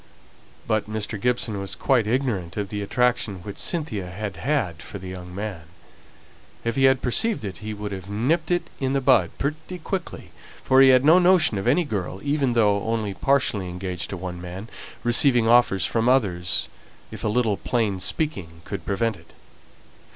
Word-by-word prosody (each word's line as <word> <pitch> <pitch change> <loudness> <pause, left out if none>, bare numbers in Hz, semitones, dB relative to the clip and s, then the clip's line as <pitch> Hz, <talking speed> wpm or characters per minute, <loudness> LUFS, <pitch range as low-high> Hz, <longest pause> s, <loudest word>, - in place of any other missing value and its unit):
But 110 -1 -1
Mr. 110 -1 -4
Gibson 120 -4 0
was 100 -1 -5
quite 125 -6 +2
ignorant 110 -9 -1
of 100 -2 -2
the 105 0 -4
attraction 105 -4 0
which 100 0 -7
Cynthia 150 - -2
had 100 +3 -5
had 115 - -1
for - - -8
the 95 -1 -8
young 90 -1 -8
man. 100 -4 -5 1.0
If 115 -1 -1
he 135 - +3
had 130 -1 +3
perceived 190 - +1
it, 95 - -6
he 110 0 -6
would 105 0 -5
have 95 0 -7
nipped 140 +11 0
it 175 -1 -1
in 135 0 -1
the 140 - +2
bud 125 -10 +4
pretty 155 +5 -4
quickly, 180 +1 -5 0.3
for 130 0 +5
he 135 - +8
had 130 +1 +5
no 165 +4 +7
notion 175 - +4
of 95 - -4
any 150 +8 +4
girl, 95 - -4
even 140 -3 +1
though 105 -3 +3
only 110 -3 -1
partially 110 -6 0
engaged 90 0 -4
to 100 - -4
one 90 -1 -6
man, 90 +5 -8 0.3
receiving 120 -1 +4
offers 115 -7 +4
from 115 +1 +1
others, 95 -10 +1 0.4
if - - -8
a - - 0
little 110 -2 +1
plain 110 -6 -1
speaking 95 - -3
could 95 -5 -6
prevent 110 +1 0
it. - - -20
110 Hz, 180 wpm, -24 LUFS, 95-130 Hz, 1.0 s, he